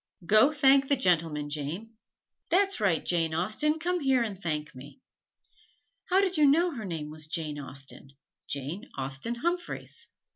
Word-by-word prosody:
"Go 215 - +6
thank 275 -2 +4
the 280 - +3
gentleman, 165 - +1
Jane." 160 +10 -4 0.6
"That's 390 -1 +3
right, 190 -6 +1
Jane 165 -2 +1
Austen, 215 - +1
come 355 +2 -1
here 265 -5 +2
and 200 -4 -5
thank 155 -3 -3
me!" 135 - -12 1.1
"How 380 +1 +4
did 375 -3 0
you 300 -1 +6
know 335 +5 +4
her 230 -8 -6
name 160 -4 -5
was 155 0 -5
Jane 155 -2 -3
Austen 135 0 -7 0.4
Jane 150 - -5
Austen 135 - -2
Humphreys?" 345 +7 -3
200 Hz, 150 wpm, -28 LUFS, -, 1.1 s, Go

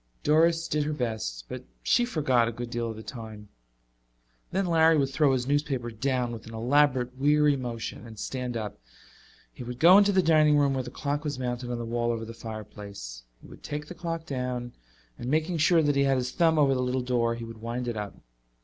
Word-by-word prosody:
Doris 165 +2 +3
did 150 0 0
her 155 - -1
best, 110 - -3
but - - -7 0.2
she 240 - +3
forgot 135 - +2
a - - -1
good 120 +1 -6
deal 120 -1 -2
of 110 - -5
the 110 - -9
time. 110 -4 -9 1.0
Then 195 +1 0
Larry 165 -2 +4
would 135 -2 +1
throw 145 0 +3
his 125 -2 0
newspaper 140 -4 -1
down 125 +1 -1
with 115 -1 -8
an 115 - -8
elaborate 125 +1 +2
weary 150 +1 +4
motion 120 -2 -5
and 110 -1 -11
stand 125 +2 -4
up. 105 - -5 0.7
He - - -8
would 120 0 -6
go 175 +7 +8
into 205 0 +4
the 190 -2 +3
dining 155 -2 +5
room 140 -1 +3
where 130 - 0
the 125 - -7
clock 145 +3 -3
was 145 -3 -3
mounted 125 -1 -3
on 120 - -2
the 120 - -4
wall 120 +1 -1
over 115 -1 -2
the 115 - -8
fireplace. 100 - -8 0.2
He - - -12
would - - -14
take 150 0 -5
the 165 - -9
clock 165 -2 -4
down 125 -3 -4 0.5
and 120 - -4
making 160 +4 +1
sure 160 +1 +4
that 145 -1 +2
he 140 0 +3
had 135 -1 +3
his 125 0 -2
thumb 165 0 +3
over 140 -3 +4
the 130 - 0
little 125 +1 0
door, 120 -2 +1
he 115 - -7
would 115 -1 -10
wind 120 +2 -4
it 120 - -2
up. 105 -1 -5
125 Hz, 220 wpm, -27 LUFS, 115-150 Hz, 1.0 s, go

